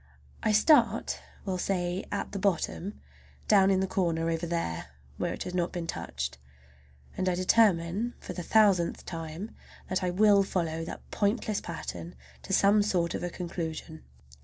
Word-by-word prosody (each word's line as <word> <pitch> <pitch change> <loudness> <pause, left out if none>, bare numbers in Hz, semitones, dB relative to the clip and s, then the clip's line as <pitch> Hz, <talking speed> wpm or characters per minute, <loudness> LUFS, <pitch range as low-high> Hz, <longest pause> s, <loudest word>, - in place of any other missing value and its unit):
I 215 - +2
start, 255 +9 +4 0.3
we'll 185 -2 -2
say, 180 0 -1
at 205 - -3
the 200 - -4
bottom, 195 +1 -1 0.5
down 195 -2 +6
in 190 -1 +3
the - - +2
corner 165 -3 0
over 165 +1 -2
there 125 - -2 0.3
where - - -1
it - - -4
has 180 - -6
not 175 -1 0
been 175 -2 -4
touched, 65 - -4 0.8
and 185 0 0
I 180 - +1
determine 190 +2 +3
for - - -7
the 180 - -5
thousandth 195 -3 +3
time 165 +5 -6 0.4
that 185 0 0
I 180 - +1
will 200 +2 +5
follow 165 -4 -1
that - - -8
pointless 210 0 0
pattern 90 - -6 0.3
to - - -8
some 205 +1 +5
sort 180 -5 +1
of - - -3
a 175 - -2
conclusion. 165 -2 -5
180 Hz, 160 wpm, -29 LUFS, 165-200 Hz, 0.8 s, down